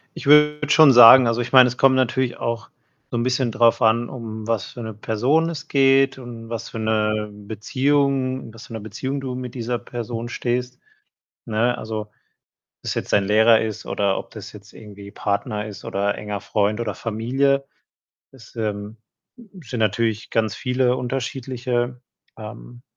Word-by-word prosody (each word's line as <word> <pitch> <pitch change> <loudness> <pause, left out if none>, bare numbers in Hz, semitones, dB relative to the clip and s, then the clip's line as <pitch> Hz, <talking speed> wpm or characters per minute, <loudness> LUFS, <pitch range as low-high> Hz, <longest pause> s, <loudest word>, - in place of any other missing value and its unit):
Ich - - -9
würde 150 0 +5
schon 150 -1 +7
sagen 120 +1 +9
also, 115 +1 0
ich 120 - -4
meine, 130 -1 +8
es 125 - -6
kommt 135 -1 +5
natürlich 130 0 0
auch 115 -2 -4 0.4
so - - -3
'n 115 - 0
bisschen 130 0 0
drauf 115 +2 +3
an, 115 +1 +2
um 110 -4 -7
was 115 -4 -1
für 120 - -8
'ne 110 -1 -6
Person 125 +10 0
es 165 -2 -7
geht 135 -1 +3
und 115 -3 -10
was 115 -2 -5
für - - -7
'ne 110 -1 -1
Beziehung 130 +5 -1
in 115 - -12
was 115 - -12
für 115 - -11
'ner 110 - -5
Beziehung 130 +7 -5
du 130 -2 -4
mit 125 -1 -7
dieser 120 -1 -3
Person 120 0 -6
stehst, 125 +1 -3 0.7
ne? 115 +2 0
Also, 110 -1 -4
ob 105 - -15 0.7
das - - -4
jetzt - - -4
dein 100 - +4
Lehrer 110 +2 +5
ist 110 -2 -5
oder 100 -1 0
ob - - -7
das - - -10
jetzt 105 +1 -15
irgendwie 100 -2 -12
Partner 105 +1 -3
ist 100 -3 -10
oder 100 +1 -1
enger 105 -1 -5
Freund 105 +3 -1
oder 105 -5 -3
Familie. 135 +6 0 0.7
Das, 130 -4 -17
ähm, 105 0 -4 0.6
sind 125 -3 -6
natürlich 110 0 0
ganz 110 -3 0
viele 125 +1 0
unterschiedliche, 125 -1 -3 0.4
ähm, - - -11
115 Hz, 170 wpm, -22 LUFS, 110-130 Hz, 0.7 s, sagen